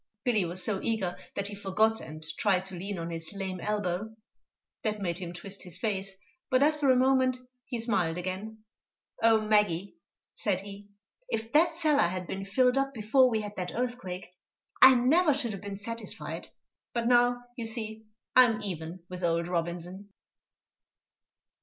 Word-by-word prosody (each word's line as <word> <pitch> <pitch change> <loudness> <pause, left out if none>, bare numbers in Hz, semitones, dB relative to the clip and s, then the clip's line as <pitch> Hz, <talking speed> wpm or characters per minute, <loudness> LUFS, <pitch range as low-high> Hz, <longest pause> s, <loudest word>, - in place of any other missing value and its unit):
Billy 220 -7 +2
was 180 +2 -1
so 200 0 +1
eager 200 -6 -1 0.2
that 200 0 -1
he - - -7
forgot, 205 +3 +1
and 155 0 -9
tried 190 -3 +2
to 190 -1 -6
lean 195 +2 -4
on 165 0 -4
his 165 -1 -4
lame 190 -2 -4
elbow. 210 +1 -2 0.7
That 215 -3 -1
made 175 -3 -2
him 175 -2 -5
twist 195 +3 -8
his 180 -2 -8
face, 195 -2 -2 0.3
but 255 +1 +4
after 300 -2 +3
a 260 - +6
moment 260 0 +3 0.3
he 245 - -4
smiled 195 -8 0
again. 195 +5 -5 0.6
"Oh, 225 -1 +5
Maggie," 210 -4 +2 0.4
said 190 -3 -1
he, 200 0 -10 0.4
"if 225 - -3
that 320 +3 +4
cellar 305 - +3
had 180 +1 -4
been 195 +2 -5
filled 250 +6 +3
up 275 0 -1
before 240 +4 +4
we 220 -2 0
had 210 0 -7
that 180 -1 -3
earthquake, 235 -8 -4 0.5
I 260 0 +10
never 295 +5 +4
should 255 -5 -1
have 195 -2 -6
been 200 -1 -6
satisfied; 230 +1 -6 0.4
but 235 -1 -1
now, 245 0 +4
you 235 -3 -4
see, 220 -1 -3 0.3
I'm 245 -3 +6
even 170 -2 -5
with 180 0 -7
old 170 0 +1
Robinson!" 175 +3 -3
205 Hz, 165 wpm, -29 LUFS, 185-240 Hz, 0.7 s, I